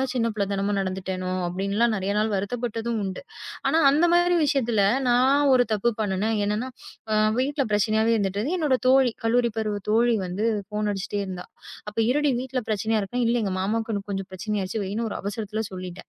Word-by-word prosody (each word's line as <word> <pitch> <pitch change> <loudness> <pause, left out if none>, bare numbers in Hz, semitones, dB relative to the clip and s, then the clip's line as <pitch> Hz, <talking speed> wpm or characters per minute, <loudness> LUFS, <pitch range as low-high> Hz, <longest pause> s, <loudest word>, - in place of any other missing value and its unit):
தான் 265 -1 -1
சின்னப் 230 -3 0
பிள்ளைத்தனமா 200 0 -1
நடந்துட்டேனோ" 185 -1 -3 0.2
அப்படி 185 +3 -3
எல்லாம் 235 0 +3
நிறைய 195 +1 -1
நாள் 215 +1 +1
வருத்தப்பட்டதும் 230 +2 -2
உண்டு. 190 +5 -5 0.5
ஆனா 320 - +3
அந்த 320 +5 +3
மாரி 350 0 +4
விஷயத்துல 240 -8 +1 0.3
நான் 265 +4 +4
ஒரு 245 -1 +5
தப்பு 215 +3 +2
பண்ணுனேன். 210 +2 0
என்னன்னா, 210 +5 -1 0.7
வீட்டுல 275 +1 0
பிரச்சனாவே 220 +2 +2
இருந்திட்டு 200 +1 -1
என்னோட 290 -5 +2
தோழி, 260 -2 +5
கல்லூரி 235 +1 +2
பருவ 210 -2 -2
தோழி 235 +2 +3
வந்து 190 +5 -3 0.2
ஃபோன் 210 0 -1
அடிச்சிட்டே 200 +1 -3
இருந்தா. 185 -1 -7 0.4
அப்ப 210 - -8
இருடி 295 0 +2
வீட்டுல 260 -1 -3
பிரச்சனை 215 +2 0
இருக்கு. 240 +5 -2
இல்ல 235 +1 +2
எங்க 195 -2 -1
மாமாக்கு 225 +3 -1
இன்னும் 200 0 -5
கொஞ்சம் 195 0 -4
பிரச்சனை 210 +3 -4
ஆயிருச்சு. 200 +4 -3
வைன்னு 215 +4 -2
ஒரு - - -4
அவசரத்துல 210 +2 -3
சொல்லிட்டேன். 185 -1 -8
220 Hz, 175 wpm, -25 LUFS, 195-245 Hz, 0.7 s, ஒரு